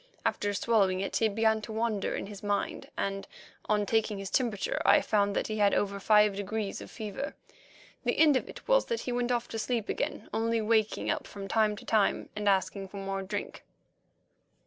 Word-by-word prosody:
After 205 - 0
swallowing 195 -5 +2
it 195 - -1
he 225 - +3
began 220 +1 +2
to 215 - -7
wander 220 -2 -1
in - - -4
his 200 0 -9
mind, 205 -1 -2
and, 195 0 -2 0.4
on 210 -1 +2
taking 220 0 +1
his 195 -1 -6
temperature, 225 -7 0
I - - +6
found 205 -2 +1
that - - 0
he 215 0 -3
had 205 -1 +4
over 200 0 0
five 210 0 +4
degrees 205 +1 -3
of - - -9
fever. 220 +6 -5 0.7
The - - 0
end 305 -3 +6
of 260 - -1
it - - -11
was - - +4
that 465 - -2
he 250 - -3
went 245 0 0
off 240 -1 0
to 225 - -4
sleep 230 -1 -1
again, - - -2
only 225 +1 +1
waking 220 -1 +1
up - - -3
from 195 -1 -7
time 215 0 +2
to - - -11
time 215 -3 +1
and 210 -1 +1
asking 195 0 0
for 200 - -10
more 195 0 -3
drink. 200 +2 -5
210 Hz, 200 wpm, -30 LUFS, 200-225 Hz, 0.7 s, I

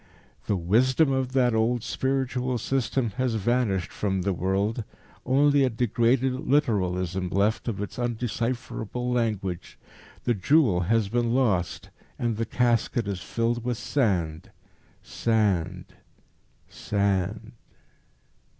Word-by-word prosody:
The 100 - +1
Wisdom 130 - +3
of 130 -1 -1
that 125 -3 +3
old 115 +1 +1
spiritual 130 -1 -1
system 125 -1 -1
has 130 -3 0
vanished 110 -4 0
from 95 -3 -1
the 100 0 0
world, 100 +6 -1 0.4
only 140 +2 +4
a 130 - +3
degraded 120 +2 +1
literalism 95 - +1
left 100 +6 0
of 105 -4 -2
its 105 +4 -5
undecipherable 120 0 -3
language. 105 -7 -2 0.5
The 120 - +2
jewel 115 - +3
has 115 -2 +3
been 120 +2 0
lost, 100 -10 0 0.3
and 115 -3 -1
the 115 -1 -2
casket 120 -2 +1
is 95 -3 -3
filled 115 +4 -1
with 120 -1 -2
sand, 95 - -1 0.5
sand, 95 -6 0 0.8
sand." 100 +2 -1
115 Hz, 115 wpm, -26 LUFS, 100-125 Hz, 0.8 s, only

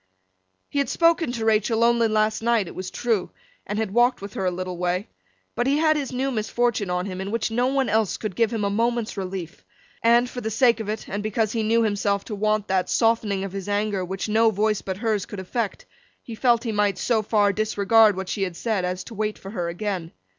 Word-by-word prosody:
He 285 - -2
had 280 - 0
spoken 335 -4 +3
to 225 -2 -3
Rachael 220 +1 +2
only 235 -1 +4
last 215 0 +1
night, 230 -3 +2
it - - -8
was 185 0 -5
true, 225 -6 -1 0.4
and 205 - -3
had 215 -3 -2
walked 240 +2 +3
with 200 0 -8
her 190 - -3
a - - +3
little 180 0 -4
way; 180 +3 -1 0.4
but 240 - -1
he 280 +2 +3
had 310 0 +3
his 285 -3 -2
new 265 +2 -1
misfortune 225 -2 0
on 180 0 -1
him, 185 -1 -5
in 195 - -4
which 230 +1 -1
no 245 +3 +1
one 270 -1 +1
else 220 -2 +1
could 210 -5 -5
give 230 +1 +2
him 225 -3 -2
a 200 - 0
moment's 235 +1 0
relief, 185 -4 -6 0.4
and, 235 +2 +4
for 245 0 -6
the 220 - -2
sake 235 +2 +3
of 215 -2 -4
it, 215 +1 -4
and 205 +1 -3
because 215 0 0
he 230 - -1
knew 225 +2 +2
himself 200 -2 0
to 220 - -6
want 215 0 0
that 190 -1 0
softening 225 -4 +1
of 195 - -5
his 195 0 -5
anger 205 -2 0
which 190 +3 -4
no 225 +1 +4
voice 215 0 0
but 190 -1 -4
hers 215 -2 -1
could 205 -5 -7
effect, 205 +3 -3 0.4
he 230 - -8
felt 235 0 +2
he 230 - -2
might 205 -2 +1
so 230 -3 +1
far 205 -1 +2
disregard 215 0 +3
what 190 -1 -4
she 195 - -3
had 180 -3 -2
said 220 -5 -1
as 180 +1 -2
to - - -10
wait 215 0 -2
for 195 - -9
her 175 -5 -2
again. 175 -2 -4
215 Hz, 235 wpm, -24 LUFS, 195-230 Hz, 0.4 s, only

